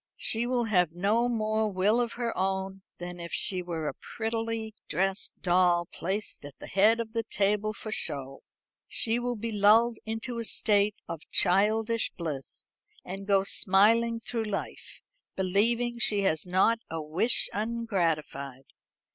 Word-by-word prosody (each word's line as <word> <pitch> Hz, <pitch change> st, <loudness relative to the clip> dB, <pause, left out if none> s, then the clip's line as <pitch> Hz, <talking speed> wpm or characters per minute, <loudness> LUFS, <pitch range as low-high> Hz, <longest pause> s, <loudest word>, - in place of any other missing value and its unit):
She 230 Hz, +2 st, +1 dB
will 245 Hz, -1 st, +1 dB
have 180 Hz, -7 st, +2 dB
no 210 Hz, +7 st, +1 dB
more 215 Hz, -2 st, 0 dB
will 205 Hz, +5 st, +2 dB
of 235 Hz, -1 st, -2 dB
her 235 Hz, -1 st, -3 dB
own 190 Hz, 0 st, -2 dB, 0.2 s
than 175 Hz, 0 st, -7 dB
if 170 Hz, 0 st, -7 dB
she 185 Hz, -2 st, +1 dB
were 165 Hz, -3 st, -4 dB
a -, -, -2 dB
prettily 225 Hz, -1 st, -4 dB, 0.2 s
dressed 190 Hz, +4 st, 0 dB
doll 175 Hz, -1 st, +3 dB
placed 195 Hz, +1 st, -3 dB
at 145 Hz, -1 st, -11 dB
the -, -, -10 dB
head 215 Hz, +4 st, +3 dB
of 225 Hz, -1 st, -4 dB
the 230 Hz, -, 0 dB
table 210 Hz, -1 st, 0 dB
for 215 Hz, 0 st, -7 dB
show. 135 Hz, -8 st, -3 dB, 0.5 s
She 230 Hz, +1 st, +1 dB
will 245 Hz, 0 st, -2 dB
be 230 Hz, +1 st, -4 dB
lulled 220 Hz, +3 st, +4 dB
into 225 Hz, +2 st, -4 dB
a -, -, -2 dB
state 210 Hz, -2 st, +2 dB
of 165 Hz, -2 st, -6 dB
childish 215 Hz, +4 st, +2 dB
bliss, 150 Hz, -7 st, -5 dB, 0.3 s
and 195 Hz, +2 st, -7 dB
go 195 Hz, -1 st, +4 dB
smiling 225 Hz, +5 st, +3 dB
through 230 Hz, 0 st, -3 dB
life, 205 Hz, -2 st, -6 dB, 0.3 s
believing 230 Hz, +6 st, +1 dB
she 205 Hz, -3 st, +2 dB
has 160 Hz, -2 st, 0 dB
not 190 Hz, +6 st, +3 dB
a 165 Hz, -, -4 dB
wish 160 Hz, +10 st, +2 dB
ungratified. 170 Hz, -, -2 dB
205 Hz, 150 wpm, -28 LUFS, 180-230 Hz, 0.5 s, lulled